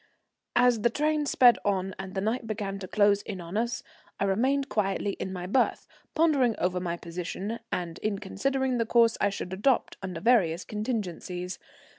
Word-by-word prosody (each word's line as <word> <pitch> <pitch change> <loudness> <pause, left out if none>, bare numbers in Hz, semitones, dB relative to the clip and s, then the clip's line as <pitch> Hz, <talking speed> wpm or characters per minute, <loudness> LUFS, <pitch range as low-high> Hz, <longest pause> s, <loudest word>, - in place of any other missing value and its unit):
As 245 -2 +4
the 235 - +4
train 300 +3 0
sped 250 -3 +6
on 195 -1 0
and 190 0 -7
the 190 - 0
night 225 +3 -1
began 200 -2 -3
to 185 - -6
close 205 0 +3
in 200 -3 -6
on 170 +2 -7
us, 235 +2 -1 0.4
I - - +1
remained 260 +8 +1
quietly 200 -3 0
in 190 - -3
my 180 -1 -5
berth, 245 +7 +1 0.3
pondering 285 -8 +3
over 180 0 0
my 175 -1 -3
position, 180 +6 -5
and 170 -1 -3
in 210 -2 -1
considering 260 +6 -1
the 230 - 0
course 230 -1 +4
I 205 - +4
should 190 -2 -5
adopt 230 +7 +1
under 185 -3 -5
various 190 -7 +3
contingencies. 185 -5 -4
205 Hz, 175 wpm, -28 LUFS, 185-240 Hz, 0.4 s, sped